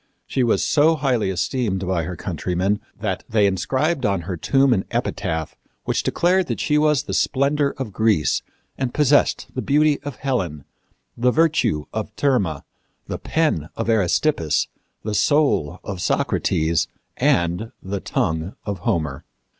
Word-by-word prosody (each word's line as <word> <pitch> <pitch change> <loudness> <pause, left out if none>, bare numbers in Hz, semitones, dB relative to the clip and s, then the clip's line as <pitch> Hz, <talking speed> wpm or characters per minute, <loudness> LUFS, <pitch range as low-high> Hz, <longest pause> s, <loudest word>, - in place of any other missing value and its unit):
She 130 - -1
was 120 -2 +2
so 160 +2 +4
highly 130 -8 +1
esteemed 95 +1 -1
by 85 -4 0
her 90 +2 -5
countrymen 90 +4 -1 0.2
that - - -2
they 105 -2 +3
inscribed 130 - 0
on 100 -4 +1
her 90 +2 -4
tomb 135 - +3
an 95 -4 0
epitaph 80 -2 -2 0.3
which - - 0
declared 180 +2 +2
that - - -3
she 150 -1 +2
was 150 -4 +3
the 95 - -5
splendor 140 +5 +1
of 125 -7 -5
Greece 110 -8 +2 0.4
and 130 -2 -2
possessed 145 -1 +3
the 130 - -2
beauty 150 +1 +2
of 145 -2 -6
Helen, 90 - -2 0.5
the 125 +2 +2
virtue 155 - +2
of 110 -1 -3
Thirma, 105 - +1 0.4
the - - -5
pen 150 - 0
of 115 0 0
Aristippus, 90 - +1 0.3
the 105 - -3
soul 105 - +2
of 95 -3 -5
Socrates, 80 -2 +1 0.3
and 85 +6 +1
the 100 +1 -3
tongue 80 +1 -2
of 100 -3 -3
Homer. 80 -5 -1
110 Hz, 145 wpm, -22 LUFS, 90-140 Hz, 0.5 s, so